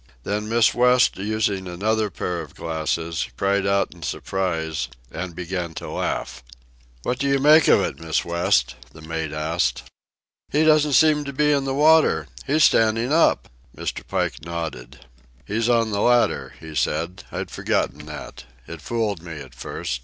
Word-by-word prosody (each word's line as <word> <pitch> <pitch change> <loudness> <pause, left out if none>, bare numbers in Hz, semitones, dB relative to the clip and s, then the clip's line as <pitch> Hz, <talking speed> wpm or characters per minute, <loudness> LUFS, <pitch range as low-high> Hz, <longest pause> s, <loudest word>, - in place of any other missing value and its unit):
Then 105 - -2
Miss 115 -1 +4
West, 125 0 +4
using 100 -2 -1
another 105 +4 0
pair 90 -1 -3
of 75 -3 -11
glasses, 80 0 -2
cried 100 0 +1
out 100 0 +1
in - - -17
surprise 80 -5 -2 0.2
and 85 +1 -6
began 90 -2 -4
to - - -6
laugh. - - -3 0.6
"What 125 - -2
do 140 - 0
you 140 0 +3
make 150 +3 +6
of - - +6
it, 70 - -3
Miss 80 -1 -1
West?" 85 -7 +1 0.2
the 80 - -13
mate 80 -1 -4
asked. 80 +3 -1 0.7
"He 150 +2 +3
doesn't 150 -2 +4
seem 150 +2 +5
to 140 - -5
be 150 +2 +2
in 140 -2 +1
the 135 0 -1
water. 155 +2 +4 0.2
He's 155 +2 +3
standing 115 +4 +3
up." 165 - +3 0.3
Mr. - - -4
Pike - - -2
nodded. 70 -7 -6 0.4
"He's 115 +3 -1
on 115 -2 +2
the 100 0 -1
ladder," 120 0 +2
he 80 -1 -10
said. 85 +5 -1
"I'd - - -5
forgotten - - -2
that. - - -9 0.2
It 85 -2 -8
fooled 110 -3 -2
me 85 -1 -8
at 70 -5 -10
first. 65 0 -5
100 Hz, 165 wpm, -23 LUFS, 80-125 Hz, 0.7 s, make